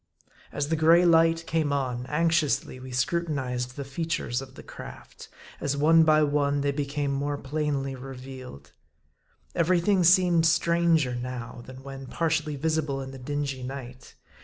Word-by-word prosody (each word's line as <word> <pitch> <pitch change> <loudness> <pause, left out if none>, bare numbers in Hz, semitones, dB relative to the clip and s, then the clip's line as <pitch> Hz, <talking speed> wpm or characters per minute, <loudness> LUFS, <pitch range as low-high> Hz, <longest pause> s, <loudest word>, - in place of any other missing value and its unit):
As 145 0 -2
the 160 - +2
gray 165 +3 +5
light 165 0 +4
came 160 -3 0
on, 130 -3 -2
anxiously 150 -4 +1
we 130 +1 -9
scrutinized 125 -3 -2
the 140 - -5
features 140 -3 -2
of 130 -1 -11
the - - -11
craft, - - -11 0.3
as 140 0 -1
one 160 +3 +5
by 155 -1 +4
one 145 -1 +1
they 140 0 +1
became 140 0 -2
more 145 +1 -2
plainly 140 -1 -2
revealed. 130 - -10 0.8
Every 175 +1 +2
thing 190 +1 +2
seemed 175 -2 +5
stranger 165 -5 +2
now, 120 0 -6
than 130 0 -11
when 135 -1 -8
partially 155 +1 -1
visible 150 -1 -1
in 135 0 -6
the 135 - -10
dingy 140 0 -3
night. 125 -1 -8
145 Hz, 150 wpm, -26 LUFS, 130-160 Hz, 0.8 s, gray